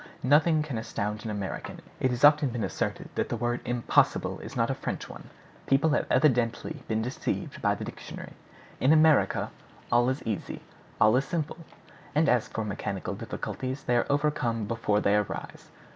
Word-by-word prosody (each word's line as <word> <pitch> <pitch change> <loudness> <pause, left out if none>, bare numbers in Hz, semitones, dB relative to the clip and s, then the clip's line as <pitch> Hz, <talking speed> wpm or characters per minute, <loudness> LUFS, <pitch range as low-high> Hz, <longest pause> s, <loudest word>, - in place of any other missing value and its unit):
Nothing 155 +4 +4
can 135 -7 -4
astound 105 -2 -3
an 110 - -4
American. 100 -2 -5 0.2
It 130 - +2
has 125 +1 -3
often 145 -1 +6
been 120 -2 -3
asserted - - -3
that - - -1
the - - -2
word 120 0 -1
"impossible" 120 -1 +1
is - - -9
not - - +1
a - - +1
French - - -4
one. - - -11 0.4
People 140 +4 +3
have 150 - +1
evidently 130 +1 +2
been 110 0 0
deceived 125 +3 -3
by - - +2
the - - -6
dictionary. - - -8 0.5
In 135 +5 +5
America, 155 -2 +4 0.4
all 120 +1 +4
is 130 +2 -2
easy, 110 -4 -4 0.4
all 110 +2 +6
is 135 - +1
simple; 160 -2 -3 0.6
and 155 +2 +4
as 125 0 +3
for 110 -3 -4
mechanical 100 - -3
difficulties, 130 +1 -5
they 125 - +1
are 120 - +2
overcome 140 -6 0
before 105 -2 0
they 100 - +3
arise. 105 -2 -3
125 Hz, 175 wpm, -28 LUFS, 110-145 Hz, 0.6 s, often